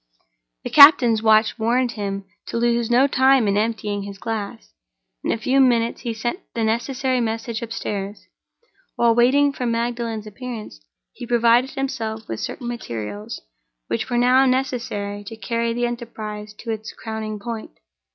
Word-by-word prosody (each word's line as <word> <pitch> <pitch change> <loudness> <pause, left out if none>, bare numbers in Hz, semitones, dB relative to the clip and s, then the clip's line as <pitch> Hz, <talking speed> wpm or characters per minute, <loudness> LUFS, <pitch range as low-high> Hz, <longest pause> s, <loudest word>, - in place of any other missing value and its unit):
The - - -5
captain's 255 -7 +8
watch 220 +1 +3
warned 240 +2 +1
him 200 -3 -4 0.2
to - - -3
lose 235 0 +1
no 245 +3 +5
time 265 -3 +4
in 200 - +2
emptying 210 -1 -1
his 200 0 -8
glass. 200 - -5 0.5
In - - 0
a - - 0
few 255 +5 +1
minutes 235 -3 +3
he 235 - -3
sent 240 - -3 0.2
the 230 - 0
necessary 250 +3 0
message 225 0 -3
upstairs. 205 -3 -5 0.7
While 235 -1 +4
waiting 275 +4 +4
for 250 -2 -3
Magdalen's 230 -2 -2
appearance, 215 - -8 0.3
he 240 - -8
provided 240 +2 +4
himself 225 -5 -3
with 110 - -4
certain 240 - -5
materials 110 - -6 0.5
which 115 - -2
were 240 - 0
now 255 +2 +5
necessary 235 -6 -2
to 225 - -7
carry 230 0 -1
the 240 +1 0
enterprise 215 -3 -6
to 230 +2 -6
its 220 -1 -5
crowning 220 -1 -5
point. 220 +1 -7
230 Hz, 150 wpm, -22 LUFS, 215-245 Hz, 0.7 s, captain's